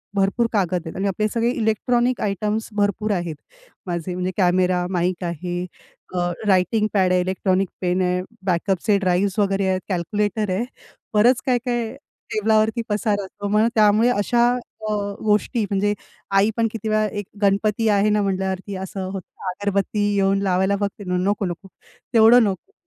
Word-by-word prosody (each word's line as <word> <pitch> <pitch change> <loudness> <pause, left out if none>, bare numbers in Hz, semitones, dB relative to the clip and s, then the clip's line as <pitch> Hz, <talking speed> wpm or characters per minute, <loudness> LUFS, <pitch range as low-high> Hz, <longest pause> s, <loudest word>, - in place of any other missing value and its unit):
भरपूर 195 +4 +2
कागद 185 -4 +1
आहेत. 160 - -7
आणि 195 +1 0
आपले 210 +2 0
सगळे 235 0 +1
इलेक्ट्रॉनिक 240 +2 +1
आयटम्स 210 +2 -1
भरपूर 205 +1 0
आहेत. 175 -4 -3 0.5
माझे 175 0 -3
म्हणजे 180 +1 -2
कॅमेरा, 180 -1 +2
माईक 180 0 -1
आहे, 175 +1 -3 0.5
अ 175 -1 0 0.2
रायटिंग 205 +3 +3
पॅड 190 -3 +3
आहे, 180 0 +3
इलेक्ट्रॉनिक 185 +1 0
पेन 180 0 +1
आहे, 180 0 +1 0.2
बॅकअपचे 190 +2 +1
ड्राईव्हज 185 +1 +1
वगैरे 195 -1 +1
आहेत, 185 0 0
कॅल्क्युलेटर 205 +3 -1
आहे. 195 +6 0 0.5
बरच 235 +4 +4
काय-काय 245 -2 -1 0.4
टेबलावरती 220 +2 +2
पसारा 205 -1 0
असतो. 205 +1 -7
मग 210 +2 +3
त्यामुळे 215 +2 +5
अशा 240 +2 +2 0.4
अ, - - 0 0.3
गोष्टी 215 +3 +1
म्हणजे 205 +1 +1 0.4
आई 200 +2 +4
पण 230 0 +2
किती 220 -1 -4
वेळा 215 0 +2
एक 205 - -3 0.2
गणपती 210 +2 +2
आहे 205 0 +3
ना 210 0 +2
म्हटल्यावरती 190 0 -2
असं 190 0 -5
होतं, 190 0 -8
अगरबत्ती 200 +2 -1 0.2
येऊन 195 0 +2
लावायला 190 +1 +2
बघते 200 0 -3
ना, 180 -1 -1
नको 200 +2 0
नको 180 +2 -6 0.5
तेवढं 230 +1 +7
नको, 205 - -3
200 Hz, 155 wpm, -22 LUFS, 185-215 Hz, 0.5 s, तेवढं